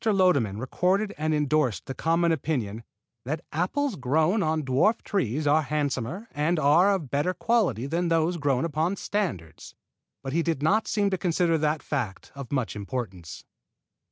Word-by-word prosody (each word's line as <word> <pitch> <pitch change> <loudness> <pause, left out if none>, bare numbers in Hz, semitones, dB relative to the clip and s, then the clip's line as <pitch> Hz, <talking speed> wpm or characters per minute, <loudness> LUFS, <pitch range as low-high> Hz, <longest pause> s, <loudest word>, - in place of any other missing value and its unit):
Lodeman 180 - +2
recorded 185 - 0
and 155 +1 -1
endorsed 150 - +1
the 135 - -5
common 165 +3 +1
opinion 125 -9 -2 0.4
"that 155 +6 -4
apples 215 - -1
grown 155 - +1
on 155 -2 0
dwarf 135 - +2
trees 150 - -1
are 150 +2 +4
handsomer 150 - -2
and 155 +4 0
of 160 +1 +3
better 150 +6 0
quality 185 - +1
than 170 +5 -1
those 165 +1 +1
grown 140 -3 +1
upon 165 +4 0
standards"; 170 - -4 0.5
but 135 -1 -4
he 170 - +2
did 165 -4 -1
not 215 +8 +2
seem 205 -2 +1
to 190 - -1
consider 170 -2 +1
that 155 0 0
fact 120 -10 -4
of 140 -4 -9
much 130 -6 -1
importance. 100 -6 -6
155 Hz, 155 wpm, -26 LUFS, 135-180 Hz, 0.5 s, are